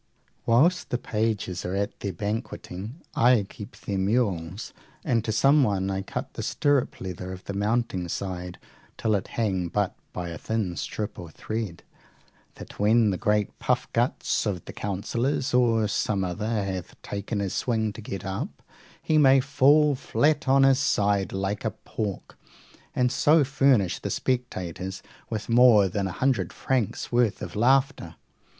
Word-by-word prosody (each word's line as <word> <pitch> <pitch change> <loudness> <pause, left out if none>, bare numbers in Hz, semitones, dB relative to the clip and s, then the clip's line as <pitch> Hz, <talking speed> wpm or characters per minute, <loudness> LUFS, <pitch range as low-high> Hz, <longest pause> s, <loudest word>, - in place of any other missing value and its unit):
Whilst 150 +11 +3
the 125 - 0
pages 105 -6 -2
are 90 +2 -3
at 100 +1 -2
their 100 - -3
banqueting, 105 - -5
I 120 -4 +4
keep 100 0 -10
their 100 -2 -3
mules, 95 -3 -1 0.3
and 115 -3 +1
to 110 - -1
someone 110 -6 +3
I 95 0 -2
cut 95 - -6
the - - -5
stirrup 145 -3 +1
leather 90 0 -6
of 95 0 -8
the 100 - -5
mounting 100 -3 0
side 90 -1 -4 0.4
till 110 -2 0
it 100 -2 -1
hang 95 -6 0
but 100 +2 -1 0.2
by 90 -1 -5
a 85 - -7
thin 110 -6 -2
strap 105 +3 -4
or 85 -2 -8
thread, 105 0 -5 0.7
that - - -11
when 110 +1 +4
the 95 - -2
great 105 -1 0
puffguts - - 0
of 90 -4 -3
the - - -8
counsellor 115 +7 -1
or 115 -3 +3
some 100 -1 0
other 105 +4 -2
hath 95 -2 -5
taken 100 +2 -4
his 100 -2 -2
swing 110 -3 0
to 115 - -9
get 100 -3 -6
up, 95 0 -5 0.4
he 155 -1 +3
may 135 -2 +6
fall 145 +2 +4
flat 145 +3 +1
on 135 +1 +5
his 135 -1 +5
side 100 -7 +1
like 95 +1 -2
a - - +1
pork, 105 -3 -6 0.6
and 125 -1 +2
so 150 +3 +4
furnish 135 -8 +2
the - - -4
spectators 95 -7 -3 0.3
with 110 -2 -4
more 115 -4 +6
than 100 +1 -2
a - - -4
hundred 130 +7 0
francs' 125 -7 -2
worth 120 -3 +1
of - - -7
laughter. 130 +5 +2
105 Hz, 155 wpm, -26 LUFS, 95-125 Hz, 0.7 s, may